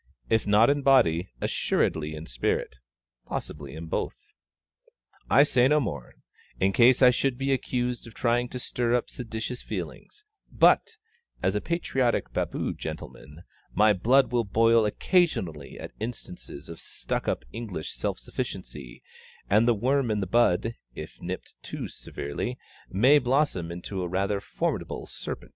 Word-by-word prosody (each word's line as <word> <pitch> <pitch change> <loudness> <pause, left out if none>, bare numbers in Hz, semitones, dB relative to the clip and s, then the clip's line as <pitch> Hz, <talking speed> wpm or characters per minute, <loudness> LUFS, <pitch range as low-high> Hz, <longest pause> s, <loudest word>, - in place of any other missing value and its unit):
_ - - -52 0.3
If 110 -2 +2
not 105 +5 +6
in 145 0 0
body, 95 -11 +4
assuredly 80 0 0
in 75 +1 -7
spirit. - - -2 0.5
Possibly 70 -2 -6
in 80 +1 -6
both. 80 - -2 1.1
I 140 - +7
say 125 -3 +4
no 150 +2 +4
more, 70 - -4 0.4
in 95 +1 +2
case 125 +3 +6
I 125 - +9
should 125 0 0
be 135 +1 +1
accused 125 -2 -2
of 115 - -13
trying 120 0 +1
to 125 - -5
stir 120 -1 0
up 125 - -1
seditious 115 +1 -5
feelings; 420 0 -7 0.3
but, 450 -1 +4 0.5
as - - +2
a - - -1
patriotic 135 -8 0
Baboo - - -1
gentleman, 75 +6 -8 0.3
my 105 0 +5
blood 125 +8 +3
will 120 -1 +2
boil 115 +1 +4
occasionally 105 - 0
at - - -7
instances 95 -9 -7
of 85 -1 -9
stuck - - -4
up - - -1
English 100 -9 -5
self - - -2
sufficiency, 65 -5 -6 0.5
and 110 +4 +5
the 120 - +4
worm 130 +3 +1
in 105 -1 +1
the 95 - -1
bud, 115 +1 +2 0.2
if - - -9
nipped - - -6
too - - -5
severely, 70 - -5 0.3
may 130 +10 +5
blossom 125 - +1
into 90 +2 -5
a 90 - -2
rather 100 +2 0
formidable - - -3
serpent! - - -7
115 Hz, 150 wpm, -27 LUFS, 90-125 Hz, 1.1 s, I